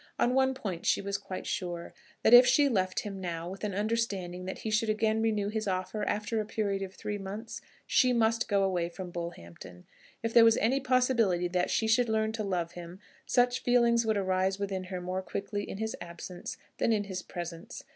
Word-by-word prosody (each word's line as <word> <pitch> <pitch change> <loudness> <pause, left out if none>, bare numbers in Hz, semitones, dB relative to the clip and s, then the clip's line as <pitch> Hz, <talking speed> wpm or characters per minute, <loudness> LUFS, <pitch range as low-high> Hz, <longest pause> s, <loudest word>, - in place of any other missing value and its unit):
On 245 - +2
one 265 0 +3
point 190 -9 -5
she - - +3
was 200 0 -3
quite 195 -2 -7
sure, 175 -5 -4 0.3
that 225 - +5
if 245 +1 +12
she 285 +3 +5
left 185 -7 0
him 195 -2 -6
now, 170 -2 -4
with 190 +3 -8
an 205 -3 -2
understanding 200 -4 -2
that 190 - -5
he 220 - -4
should 215 +1 +1
again 220 +1 +1
renew 215 -2 +1
his 215 0 -3
offer 185 +3 -2
after 210 +1 -1
a - - -5
period 200 -3 -1
of 190 -1 -6
three 205 -1 -4
months, 205 +4 -6 0.2
she 255 -1 +4
must 230 0 +2
go 200 -2 +2
away 180 -3 0
from 180 0 -8
Bullhampton. 90 - -8 0.4
If 230 0 -1
there 235 - +8
was 225 -1 +6
any 255 +6 +2
possibility 250 -9 +2
that 180 0 0
she 225 - +1
should 235 +1 +3
learn 220 0 +1
to 220 -1 -3
love 175 -4 -2
him, 175 +1 -9 0.3
such 245 0 +2
feeling 235 -1 +3
would 220 -2 +1
arise 190 0 +1
within 195 -2 -3
her 185 -1 -5
more 185 +1 -3
quickly 205 +2 -4
in - - -5
his 220 +1 -3
absence 175 +7 -7 0.2
than - - +2
in 210 -2 +2
his 190 -2 -5
presence. 170 -2 -7
200 Hz, 205 wpm, -30 LUFS, 185-225 Hz, 0.4 s, if